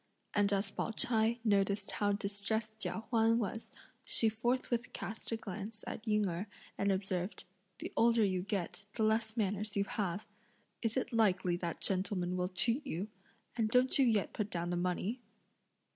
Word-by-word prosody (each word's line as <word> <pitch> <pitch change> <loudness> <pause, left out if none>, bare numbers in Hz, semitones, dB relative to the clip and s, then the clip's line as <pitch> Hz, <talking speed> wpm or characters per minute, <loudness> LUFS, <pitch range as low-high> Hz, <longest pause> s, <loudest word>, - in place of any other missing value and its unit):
And 205 -1 +3
as 200 0 +1
Pao - - -2
ch'ai 225 0 +3
noticed 200 -2 +2
how 205 -1 +1
distressed 210 +2 -1
Chia 220 - -2
Huan 225 -1 +4
was, 225 0 -3 0.3
she 225 - +4
forthwith 240 +2 -1
cast 220 +1 -4
a 225 - 0
glance 215 0 -6
at 220 - -6
Ying 210 -1 +3
Erh 180 +4 -3 0.3
and 200 0 +1
observed: 190 0 -2 0.3
"The - - -6
older 230 -1 +5
you 185 -2 0
get, 200 0 -3
the 225 - 0
less 220 +1 +1
manners 210 0 -1
you 200 - +3
have! 200 -1 -2 0.6
Is 225 +1 0
it 255 - -1
likely 190 -5 +3
that 170 -2 -4
gentlemen 185 -2 +1
will 180 0 0
cheat 230 +9 +2
you? 190 +3 -3 0.5
and 225 -2 +1
don't 250 +4 +4
you 270 - +6
yet 215 -4 +2
put 210 -1 -2
down 175 -2 -2
the - - 0
money?" 180 +7 -1
210 Hz, 170 wpm, -34 LUFS, 195-225 Hz, 0.6 s, you